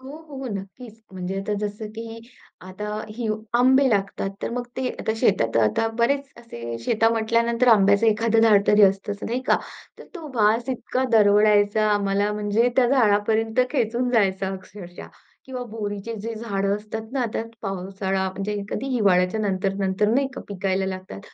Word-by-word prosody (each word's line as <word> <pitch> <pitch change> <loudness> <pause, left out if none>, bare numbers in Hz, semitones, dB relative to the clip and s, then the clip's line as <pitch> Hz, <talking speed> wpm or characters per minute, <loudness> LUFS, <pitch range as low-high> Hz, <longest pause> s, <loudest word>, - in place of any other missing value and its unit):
हो, 270 +3 -9
हो 270 -2 -7
नक्कीच 215 +4 -9
म्हणजे 185 +1 -4
आता 210 +1 -3
जसं 210 +1 -4
की 225 0 -7 0.5
आता 200 +3 -6 0.3
ही 235 -3 -3 0.3
आंबे 260 +2 +5
लागतात 195 -1 -1
तर - - -2
मग 245 +1 -4
ते 260 -1 -1
आता 220 - -1
शेतात 150 - +1
आता 105 - +1
बरेच 275 +3 0
असे, 120 - -7
शेता 225 0 +3
म्हटल्यानंतर 230 +2 +1
आंब्याचं 200 0 +5
एखाद 225 +1 +2
झाड 210 -3 +5
तरी 210 0 +6
असतं 195 +1 +3
नाही 245 +3 -2
का? - - +4 0.4
तर - - -11
तो 330 -4 -8
वास 225 +3 +2
इतका 255 +1 -2
दरवळायचा, 210 0 +4
आम्हाला 205 0 +1
म्हणजे 210 +3 +1
त्या 255 - +5
झाडापर्यंत 225 -1 +2
खेचून 245 -2 0
जायचा 195 -4 +1
अक्षरशः 185 -1 -11 0.4
किंवा 255 -1 -5
बोरीचे 210 0 -5
जे 230 0 -4
झाड 200 -3 -3
असतात 220 +2 -8
ना 270 - -1
आता 225 -1 -2 0.2
पावसाळा 195 0 -2
म्हणजे 195 +2 -4
एखादी 205 +6 -4
हिवाळ्याच्या 190 0 +2
नंतर-नंतर 195 0 0
नाही 270 +4 +2
का - - -6
पिकायला 190 -1 -1
लागतात, 185 - -6
210 Hz, 160 wpm, -23 LUFS, 195-230 Hz, 0.5 s, तरी